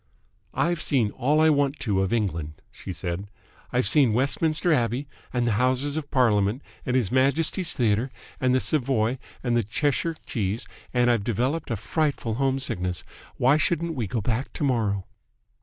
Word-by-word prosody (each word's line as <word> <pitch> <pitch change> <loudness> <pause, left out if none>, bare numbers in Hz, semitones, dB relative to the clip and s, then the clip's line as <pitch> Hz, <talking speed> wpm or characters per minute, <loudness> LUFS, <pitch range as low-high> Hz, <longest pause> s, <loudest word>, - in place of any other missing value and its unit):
"I've 170 -2 +1
seen 120 -7 +1
all 140 +6 +1
I 160 0 +5
want 140 0 +1
to 100 -5 +1
of 95 - -1
England," 85 -9 -2
she - - -8
said, 90 +2 -4 0.4
"I've 125 +1 +2
seen 135 -8 +5
Westminster 155 +7 +2
Abbey 125 +1 0 0.2
and 125 -1 0
the 120 - +2
Houses 130 +3 +2
of 155 -2 -4
Parliament 110 -1 +2 0.2
and 125 - +1
His 120 -7 +1
Majesty's 155 +7 +2
Theatre 115 +1 +1 0.3
and 130 0 +2
the - - +4
Savoy 130 -4 0 0.2
and 120 -2 +1
the 120 - +4
Cheshire 145 - -1
Cheese, 105 0 -2 0.2
and 120 -1 +3
I've 115 -4 +1
developed 125 +8 -1
a 115 - 0
frightful 125 +2 -1
home 135 0 +2
sickness. 90 - -2 0.3
Why 135 +4 +4
shouldn't 170 +1 0
we 120 -8 -2
go 115 +2 -2
back 120 +5 -1
to - - -4
morrow?" 110 -8 0
125 Hz, 170 wpm, -25 LUFS, 110-145 Hz, 0.4 s, I